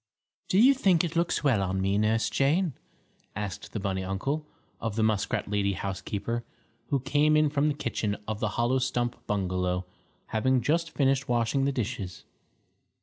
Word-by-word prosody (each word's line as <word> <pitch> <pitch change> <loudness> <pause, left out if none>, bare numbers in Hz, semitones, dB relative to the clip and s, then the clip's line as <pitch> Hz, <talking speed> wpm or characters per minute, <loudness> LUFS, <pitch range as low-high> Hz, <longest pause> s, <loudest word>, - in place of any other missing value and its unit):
"Do 185 - +1
you 255 +6 +7
think 190 - +3
it 170 -1 -3
looks 170 -2 +1
well 130 -9 +3
on 95 0 -1
me, 95 +1 +1
Nurse 110 +1 +2
Jane?" 155 +4 +2 0.6
asked 100 -2 -5
the 110 - -3
bunny 95 -1 -2
uncle, 135 +12 -2 0.3
of 115 -3 -3
the 110 - +1
muskrat 110 -3 0
lady 100 -1 +1
housekeeper, 100 +5 -3 0.4
who 140 -2 0
came 145 +3 +3
in 155 -1 +3
from 145 0 +2
the 150 - +1
kitchen 110 -6 -2
of 110 -1 -3
the 110 - 0
hollow 120 +3 +2
stump 120 -1 -1
bungalow, 90 -2 -1 0.4
having 130 +4 +2
just 165 +7 +1
finished 135 -3 +1
washing 120 +3 +1
the 140 - +2
dishes. 110 -7 -4
120 Hz, 165 wpm, -28 LUFS, 100-145 Hz, 0.6 s, you